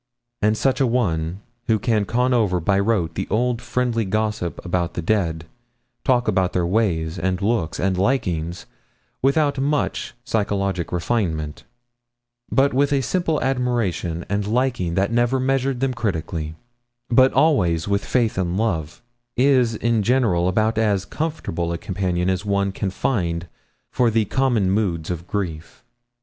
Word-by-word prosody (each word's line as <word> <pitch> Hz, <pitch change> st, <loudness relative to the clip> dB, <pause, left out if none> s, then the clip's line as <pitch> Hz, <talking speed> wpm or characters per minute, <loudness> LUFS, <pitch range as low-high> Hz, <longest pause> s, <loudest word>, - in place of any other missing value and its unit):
And 105 Hz, +1 st, +2 dB
such 135 Hz, +3 st, +1 dB
a 130 Hz, -, +4 dB
one, 90 Hz, -7 st, -1 dB, 0.3 s
who 110 Hz, -, +3 dB
can 110 Hz, -1 st, +1 dB
con 125 Hz, +4 st, +1 dB
over 105 Hz, -7 st, +2 dB
by 95 Hz, +4 st, +2 dB
rote 100 Hz, -5 st, +1 dB
the 95 Hz, -, -3 dB
old 120 Hz, +1 st, 0 dB
friendly 120 Hz, -2 st, 0 dB
gossip 105 Hz, -3 st, -2 dB
about 90 Hz, -1 st, -1 dB
the -, -, -2 dB
dead, 85 Hz, -5 st, 0 dB, 0.6 s
talk 125 Hz, -2 st, +2 dB
about 95 Hz, -3 st, +1 dB
their 90 Hz, -1 st, +1 dB
ways, 85 Hz, -4 st, 0 dB
and 90 Hz, +1 st, 0 dB
looks, 100 Hz, -5 st, -1 dB
and 95 Hz, 0 st, +1 dB
likings, 90 Hz, -7 st, -1 dB, 0.6 s
without 140 Hz, +1 st, +2 dB
much 140 Hz, -2 st, -1 dB
psychologic 100 Hz, -6 st, -1 dB
refinement, 85 Hz, -5 st, -2 dB, 0.9 s
but 140 Hz, +1 st, +3 dB
with 140 Hz, +2 st, +2 dB
a 140 Hz, -1 st, +2 dB
simple 165 Hz, +2 st, 0 dB
admiration 120 Hz, -10 st, -1 dB
and 100 Hz, 0 st, -1 dB
liking 115 Hz, -7 st, 0 dB
that 100 Hz, +4 st, +1 dB
never 120 Hz, +2 st, +2 dB
measured 135 Hz, 0 st, 0 dB
them 135 Hz, -1 st, +1 dB
critically, 80 Hz, -8 st, -3 dB, 0.6 s
but 130 Hz, +2 st, +6 dB
always 100 Hz, -, +2 dB
with 100 Hz, 0 st, 0 dB
faith 115 Hz, -6 st, 0 dB
and 90 Hz, 0 st, -1 dB
love, 90 Hz, -2 st, -2 dB, 0.3 s
is 125 Hz, -3 st, +3 dB
in 115 Hz, 0 st, +1 dB
general 105 Hz, -7 st, +2 dB
about 110 Hz, +4 st, +1 dB
as 100 Hz, -4 st, +1 dB
comfortable 100 Hz, -, -3 dB
a 85 Hz, -, -2 dB
companion 90 Hz, -1 st, -2 dB
as 95 Hz, +1 st, 0 dB
one 100 Hz, -1 st, 0 dB
can 95 Hz, 0 st, -2 dB
find 90 Hz, -5 st, -1 dB, 0.4 s
for 125 Hz, -2 st, +3 dB
the 110 Hz, -1 st, +2 dB
common 120 Hz, -5 st, +1 dB
moods 90 Hz, -6 st, 0 dB
of 85 Hz, 0 st, -5 dB
grief. 85 Hz, -6 st, -4 dB
105 Hz, 150 wpm, -22 LUFS, 90-125 Hz, 0.9 s, but